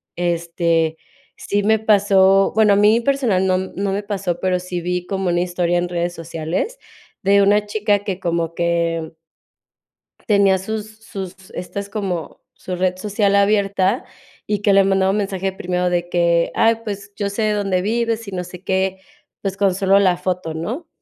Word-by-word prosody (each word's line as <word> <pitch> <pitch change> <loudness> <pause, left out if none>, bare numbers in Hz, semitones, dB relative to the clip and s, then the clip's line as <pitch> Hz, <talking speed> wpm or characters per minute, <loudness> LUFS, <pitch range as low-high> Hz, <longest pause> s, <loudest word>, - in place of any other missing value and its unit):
Este, 170 -2 0 0.4
sí 205 0 -1
me 220 +1 +3
pasó, 195 -2 +4
bueno 215 -1 +4
a - - +4
mí 210 +3 +4
personal 235 -8 +1
no 185 0 +2
no 190 +1 -3
me 200 +1 -2
pasó, 195 -4 -3
pero 185 -1 0
sí 180 0 -4
vi 180 +1 -2
como 190 -2 -1
una 175 0 +1
historia 175 -1 0
en 175 0 -2
redes 175 0 -2
sociales 165 - -4 0.5
de 200 +1 +5
una 205 +1 +3
chica 205 -1 0
que 190 -2 -3
como 170 -2 -1
que 170 -1 -1 1.2
tenía 200 -3 +4
sus 215 +2 -6
sus 190 -2 -8
estas 200 +3 -5
como 190 -7 -4
su 185 - -6
red 185 0 0
social 200 +1 +1
abierta, 200 +1 +2 0.4
y 210 -2 0
que 205 -1 +3
le 195 0 +6
mandaba 190 0 +2
mensaje 195 -2 -2
primero 180 -1 -1
de 175 0 -1
que: 170 -1 +2
"Ay, 225 0 +3
pues, 200 -1 -6
yo 200 -2 -1
sé 200 +3 -3
de 215 0 +2
dónde 195 -3 0
vives 230 +2 -1
y - - -7
no 180 -1 -2
sé 180 0 -11
qué", 190 0 0 0.4
pues, 195 -1 -3
con 195 -2 +2
solo 195 +1 +3
la 185 -3 +3
foto, 180 -3 -3
¿no? 240 - -5
190 Hz, 175 wpm, -20 LUFS, 175-205 Hz, 1.2 s, le